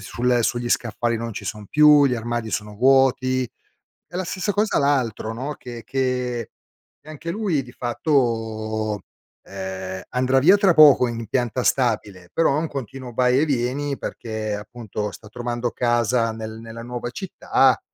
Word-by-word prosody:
sul 120 +4 0
sugli 120 +1 -1
scaffali 115 0 0
non 115 0 -4
ci - - -7
son 105 -2 -5
più, 150 0 +6
gli 125 - +1
armadi 120 -1 -3
sono 105 0 -3
vuoti 130 0 +3 0.7
e - - -3
la 185 - -1
stessa 190 +3 -2
cosa 210 +1 +1
l'altro 125 -6 0
no, 135 +6 -4
che 120 -3 -9
che 125 -3 -1 0.6
anche 155 +2 -6
lui 185 -10 0
di 120 - -13
fatto, 110 -5 -1 0.4
ehm, 95 -1 -6
andrà 130 +1 +1
via 185 +9 +6
tra 195 -4 +4
poco 145 -5 +8
in 115 -1 -4
pianta 120 +1 -1
stabile, 105 -8 0
però 165 -4 +3
è - - +2
un 165 - -2
continuo 130 -2 -7
vai 125 +2 +3
e 155 - +3
vieni 140 +1 -1
perché 110 -2 -4
appunto 105 -1 -5
sta 105 +1 -12
trovando 120 0 -3
casa 120 -1 +1
nel 110 0 -7
nella 115 0 -9
nuova 120 0 -5
città 135 -6 +2
120 Hz, 155 wpm, -22 LUFS, 110-135 Hz, 0.7 s, poco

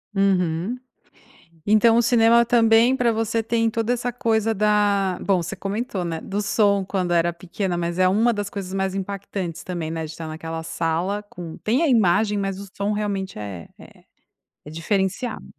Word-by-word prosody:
Uhum. 185 +1 +1 0.9
Então 220 +2 +5
o - - +5
cinema 235 0 +5
também 230 +1 +4
para 245 -3 +2
você 225 0 -1
tem 230 0 +1
toda 225 +2 0
essa 245 0 -2
coisa 225 -2 0
da 205 -3 +2
bom, 190 -3 +1
você 185 +4 -5
comentou, 200 +1 -3
né. 165 -2 -3
Do 205 +1 -3
som 205 -1 +2
quando 185 -2 -2
era 170 0 +2
pequena, 175 +1 -4
mas 170 +1 -2
é 185 - +5
uma 220 +6 +3
das 205 -1 -3
coisas 195 -2 -6
mais 190 0 -1
impactantes 195 -3 -5
também, 170 -3 -4
né. 160 -1 -3
De 155 - -8
estar 160 0 -7
naquela 160 +1 -6
sala 170 +5 -1
com 170 -4 -8
tem 245 +9 0
a 330 - +3
imagem, 210 -3 +3
mas 195 -1 -3
o 200 - -8
som 200 +1 -1
realmente 200 - -3
é 100 -5 -7
é - - -16 0.6
é 150 - -10
diferenciado. 190 +7 -2
200 Hz, 175 wpm, -23 LUFS, 175-225 Hz, 0.9 s, Então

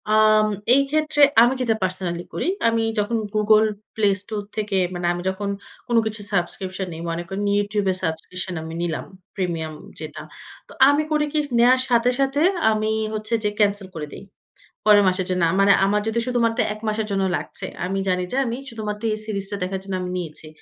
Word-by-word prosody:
আম 215 0 +5 0.3
এই 275 - +6
ক্ষেত্রে 305 0 +1 0.2
আমি 240 +2 +5
যেটা 230 -3 +2
পার্সোনালি 180 -2 -2
করি, - - -2 0.2
আমি 230 0 +2 0.2
যখন 210 +3 0 0.2
গুগল 215 0 +5 0.3
প্লে 215 -2 +2
স্টোর 210 0 -5
থেকে 210 -2 -1 0.2
মানে 175 0 -4
আমি 175 - -4
যখন 200 +2 -3 0.4
কোন 240 - 0
কিছু 215 -1 -3
সাবস্ক্রিপশন 185 +1 -2
নেই, 160 - -7
মনে 165 +1 -3
করুন 195 +1 -3
YouTube 205 0 0
এ - - 0
সাবস্ক্রিপশন 180 +3 -4
আমি 160 0 -7
নিলাম 170 -2 -2 0.3
প্রিমিয়াম 165 -4 -2 0.3
যেটা। 155 -1 -7 0.5
তো - - -16 0.2
আমি 290 +2 +3
করি 300 -1 +2
কী 305 - +2 0.2
নেয়ার 250 +2 +6
সাথে, 240 0 +3
সাথে 275 +2 +1 0.3
আমি 215 0 0 0.2
হচ্ছে 215 +1 -3
যে 210 - +2
ক্যানসেল 205 -2 +2
করে 150 -2 -5
দেই, - - -9 0.6
পরের 210 -1 +7
মাসের 185 0 0
জন্য। 180 -1 0
আ - - -1
মানে 200 0 +6
আমার 205 +2 +2
যদি 225 +1 -1
শুধুমাত্র 235 -2 +1 0.2
১ 215 - -13
মাসের 215 0 -1
জন্য 195 -1 +1
লাগছে 190 - -5 0.2
আমি 195 +2 -2
জানি 180 -1 +1
যে - - -1
আমি 235 0 -2
শুধুমাত্র 210 -2 -5
এই 215 - -2
সিরিজটা 200 -2 -4
দেখার 190 +1 -2
জন্য 195 -1 -5
আমি 180 - -4
নিয়েছি। 160 -2 -7
205 Hz, 190 wpm, -22 LUFS, 185-220 Hz, 0.6 s, পরের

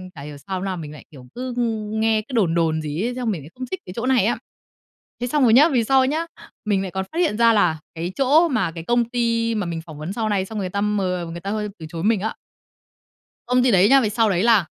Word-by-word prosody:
Chả 140 - -9
hiểu 145 0 -8
sao 185 +4 -5
no 190 -1 -2
mình 155 -3 -7
lại, 150 - -13
kiểu, 130 -4 -13
cứ, 250 0 -4
ư, - - +1 0.3
nghe 220 0 +2
cứ 255 +4 -13
đồn 175 -7 +2
đồn 160 -2 +1
gì 155 +3 -4
ấy, 245 +1 -3
xong 245 -3 -1
mình 170 -7 -4
lại 150 - -12
không 255 0 -5
thích 375 - -3
cái 180 - -8
chỗ 235 - -2
này 255 -6 +3
á." 235 - +1 0.8
Thế 245 - -1
xong 290 +2 +1
rồi 230 -3 +5
nhá, 295 +6 +7
về 245 -6 +1
sau 265 +2 +4
nhá, 320 +4 -1 0.4
mình 200 -2 +1
lại 190 - -4
còn 190 +1 -3
phát 335 - -4
hiện 315 -12 +1
ra 230 -1 +5
là 175 -7 +2 0.2
cái 170 +3 -4
chỗ 295 +6 +4
mà 205 - 0
cái 165 -1 -7
công 240 +3 +2
ty 230 -1 0
mà 205 -4 -2
mình 165 -1 -4
phỏng 155 -2 -10
vấn 155 +5 -5
sau 220 0 -2
này, 195 -2 0
xong 215 +2 -6
rồi - - -2
người 185 - -3
ta 200 - -2
m 210 0 0 0.4
người 170 - -7
ta 195 - -5
hơi 210 -1 -2
từ 160 - -8
chối 165 -1 -5
mình 215 -3 +2
á 220 +2 -2 1.1
công 250 0 +3
ty 250 - +4
đấy 195 +2 +5
nhá, 270 0 +6
về 215 - 0
sau 220 0 +2
đấy 185 +1 +1
là 225 -7 +4
210 Hz, 285 wpm, -22 LUFS, 180-245 Hz, 1.1 s, nhá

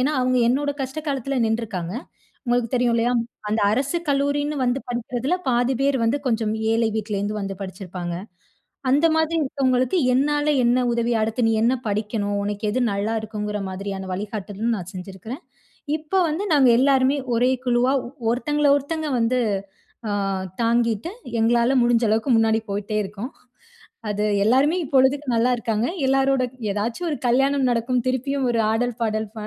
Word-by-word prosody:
ஏனா, 265 +4 +2
அவங்க 255 0 +2
என்னோட 285 +3 +1
கஷ்ட 265 +3 -5
காலத்துல 275 0 -2
நின்றுக்காங்க. 215 -5 -3 0.5
உங்களுக்கு 240 -1 +1
தெரியும் 240 -1 +2
இல்லையா. 240 +2 +2 0.4
அந்த 215 +1 0
அரசு 275 +8 0
கல்லூரின்னு 285 +1 0
வந்து 245 +2 +1
படிக்கிறதுல 245 +5 -2
பாதி 245 +1 +2
பேர் 275 0 +2
வந்து 230 +5 +2
கொஞ்சம் 225 -3 0 0.2
ஏழை 225 0 +2
வீட்லேருந்து 210 0 -2
வந்து 195 0 -4
படிச்சிருப்பாங்க. 180 -2 -6 0.8
அந்த 295 +5 +4
மாதிரி 320 +1 +1
இருக்கவங்களுக்கு 260 +2 +1 0.2
என்னால 290 +3 +1 0.2
என்ன 240 +1 +3
உதவி. 235 0 0
அடுத்து 225 +3 -1
நீ - - +2
என்ன 245 +3 +3
படிக்கணும், 205 0 -1
உனக்கு 205 +1 -4
எது 255 +4 -1
நல்லாயிருக்குங்கிற 210 0 -2
மாரியான 190 0 -5
வழிகாட்டலும், 205 +3 -3
நான் 185 -2 -7
செஞ்சிருக்குறேன். 195 - -8 0.6
இப்போ 315 +5 -1
வந்து 330 +7 -2
நாங்க 270 -4 +5
எல்லாருமே 270 +1 +3 0.2
ஒரே 245 +2 +3
குழுவா 245 +1 +2 0.4
ஒருத்தங்கள, 295 +4 +1
ஒருத்தங்க 310 +2 -4
வந்து 250 +2 +2 0.7
ஆ - - -1 0.5
தாங்கிட்டு 230 - +1 0.3
எங்களால 235 +3 +3
முடிஞ்ச 240 -1 +3
அளவுக்கு 220 +5 +1
முன்னாடி 225 0 +3
போயிட்டே 205 +2 -3
இருக்கோம். 210 +7 -7 0.8
அது 210 0 -1 0.2
எல்லாருமே 270 - +3
இப்பொழுதுக்கு 270 +1 +2
நல்லாயிருக்காங்க. 230 -1 +1 0.2
எல்லோரோட 270 -1 +2 0.3
ஏதாச்சும் 230 - -2
ஒரு 290 - -2
கல்யாணம் 270 +2 +2
நடக்கும். 240 +1 0
திருப்பியும் 260 +1 0
ஒரு 230 - 0
ஆடல், 240 +1 0
பாடல் 220 -1 0
ப - - -6
240 Hz, 145 wpm, -23 LUFS, 215-270 Hz, 0.8 s, நாங்க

